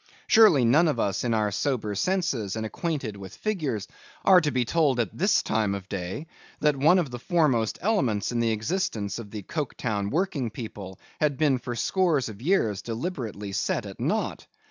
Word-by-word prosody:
Surely, 210 - +6
none 150 +9 +5
of 145 -6 0
us 100 -2 0
in 120 - 0
our 105 -2 +1
sober 110 -2 -1
senses 125 - -1
and 110 0 -3
acquainted 135 -1 -3
with 95 -1 -10
figures, 150 - -2 0.4
are 185 -2 +7
to 150 - 0
be 125 -3 0
told 145 -3 +2
at 115 -5 -1
this 200 +5 +2
time 110 -3 0
of 95 -1 -7
day, 95 - -4 0.3
that 150 -1 +3
one 155 +7 +5
of 160 -8 0
the 120 - -6
foremost 140 - +1
elements 130 - +1
in 120 - -1
the 115 -1 +2
existence 110 - -2
of 110 -3 -8
the 105 -1 -7
Coketown 115 - -3
working 155 - -1
people 105 -4 -8 0.2
had 150 -3 +1
been 145 -4 +2
for 120 0 -5
scores 160 -4 +1
of 105 0 -10
years, 125 - +1
deliberately 115 - -4
set 95 - -1
at - - -9
nought? - - -2
125 Hz, 185 wpm, -26 LUFS, 105-160 Hz, 0.4 s, are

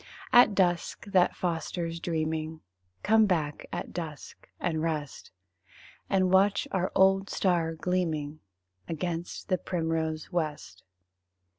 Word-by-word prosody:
At 240 -4 +7
dusk, 175 0 +1
that 190 -3 +3
fosters 170 -1 -3
dreaming 160 -1 -2 0.4
Come 220 0 +5
back 155 -6 -1
at - - -5
dusk 160 -4 -7
and 160 -3 -1
rest, 155 -4 -3 0.8
And 185 -1 +2
watch 195 +1 +4
our 185 -1 0
old 195 +1 +4
star 170 -4 +1
gleaming 160 -4 -2 0.5
Against 170 +1 -4
the 185 - +2
primrose 160 -3 -2
west. 155 -4 -3
170 Hz, 110 wpm, -28 LUFS, 160-185 Hz, 0.8 s, At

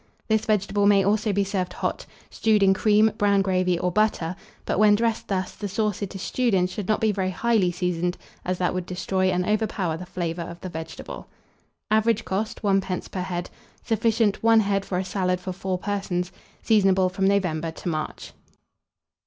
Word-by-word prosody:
This 220 0 +2
vegetable 205 -1 +1
may 200 -1 +5
also 210 +2 +1
be 200 0 +1
served 190 -2 -2
hot, - - -3 0.2
stewed 215 -2 +2
in 195 0 +6
cream, 215 +2 +4
brown 200 -1 +3
gravy, 185 -2 +1
or 180 +1 -1
butter; 185 -4 +1 0.3
but - - -1
when 210 -1 +6
dressed 230 +1 -1
thus, 190 -2 -2
the 205 - -5
sauce 210 0 -1
it 200 0 -4
is 190 - -5
stewed 245 -5 +1
in 180 -1 +3
should 185 +1 -5
not 215 - +2
be 220 -1 +2
very 190 -2 -1
highly 195 -1 +1
seasoned, 175 0 -1 0.3
as 185 0 -1
that 180 -1 0
would 185 -1 -3
destroy 185 +1 0
and 180 0 0
overpower 210 -6 0
the 180 +2 -8
flavour 170 -2 -3
of 170 +1 -7
the 185 - -5
vegetable. 160 -1 -7 0.6
Average 220 0 +2
cost, 210 +4 -3
1d. 195 -2 0
per 185 - -3
head. 175 -1 -4 0.3
Sufficient, 225 -2 +1
1 225 0 +5
head 195 -1 0
for 180 - -2
a 185 - -1
salad 185 -1 0
for 185 0 -5
4 190 0 -2
persons. 185 -2 -2 0.3
Seasonable 195 -4 +4
from 190 +1 0
November 175 -5 +1
to 160 - -8
March. 155 -2 -4
195 Hz, 185 wpm, -24 LUFS, 180-210 Hz, 0.6 s, in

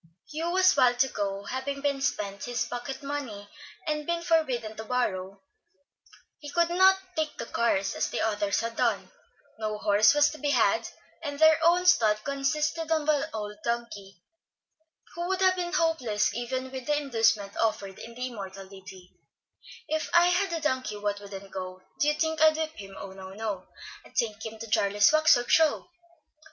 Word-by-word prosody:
Hugh 320 +3 -3
was 370 +1 +4
wild 250 -3 +4
to 265 - +4
go, 200 -2 -3
but - - -8
having 275 +1 -2
spent 200 -7 -2
his 240 -1 -1
pocket 245 +4 -6
money 265 -8 -5 0.4
and 300 -1 -2
been 340 0 -1
forbidden 255 -10 0
to 220 - -5
borrow, 200 -5 -2 1.0
he 290 - -8
could 340 +3 +1
not 380 +2 +5 0.2
take 310 -1 -2
the 235 - -5
cars 200 -5 0
as - - -1
the - - -3
others 205 -2 0
had 230 0 -4
done; - - 0 0.5
no 215 -1 -2
horse 210 +5 +4
was 290 0 +4
to 310 - -10
be 290 - -1
had, - - +2 0.3
and 290 -3 -5
their 315 +1 +6
own 350 +2 +4
stud 215 -11 +4
consisted 300 +3 -1
of 310 -2 +1
an 295 -2 +2
old 210 -1 -5
donkey, 205 -6 -4 0.9
who 345 +1 -4
would 380 0 -1
have 375 -1 +4
been 350 -1 -3
hopeless 250 - +1
even 255 +3 -4
with 260 -2 -7
the 295 0 +2
inducement 225 -7 +1
offered 200 -4 -1
in 235 0 -10
the 250 +1 -3
immortal 195 -5 -7
ditty, 190 -1 -13 0.7
"If 315 0 -2
I 345 +1 +6
had 360 +1 +1
a 330 -1 -2
donkey 260 -7 -1
what 205 0 -2
wouldn't 200 -1 -10
go, 185 -1 -7 0.2
Do 295 - +2
you 300 - +3
think 320 0 -1
I'd 315 0 +6
whip 315 -1 -2
him? 195 -5 -10
Oh, 195 - -8
no, 190 0 -10
no! 210 -3 -4 0.4
I'd - - -19
take 220 -2 -1
him 220 -1 -6
to 230 - -7
Jarley's 205 -1 +3
Wax 310 +1 +6
work 245 0 -2
Show." 320 +1 +3
245 Hz, 185 wpm, -27 LUFS, 205-310 Hz, 1.0 s, their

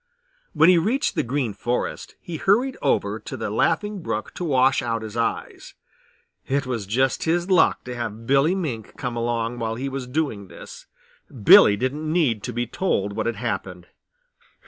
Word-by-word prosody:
When 160 - +5
he 180 -2 +6
reached 235 +11 0
the - - 0
Green 125 -3 -2
Forest 120 +4 -3
he 170 -2 -7
hurried 235 - +2
over - - 0
to - - -7
the - - -4
Laughing 205 -2 0
Brook 110 -9 -4
to - - -6
wash 135 -3 +3
out 115 -2 -2
his 110 0 -8
eyes. 115 0 -3 0.7
It 140 +1 0
was 115 -6 -4
just 130 +5 0
his 175 +3 0
luck 175 -3 +4
to 125 - -6
have 115 -1 -5
Billy 140 +8 +3
Mink 130 - -5
come 125 -2 -4
along 115 0 -2
while 115 -1 -2
he 135 +4 -4
was 135 -2 -5
doing 125 -8 -2
this. - - -12 0.6
Billy 100 +1 +8
didn't 145 +7 -2
need 140 -11 +1
to 125 - -4
be 120 +1 -2
told 105 - -1
what 110 +2 -2
had 115 - -1
happened. 95 -6 -5
125 Hz, 175 wpm, -23 LUFS, 115-160 Hz, 0.7 s, Billy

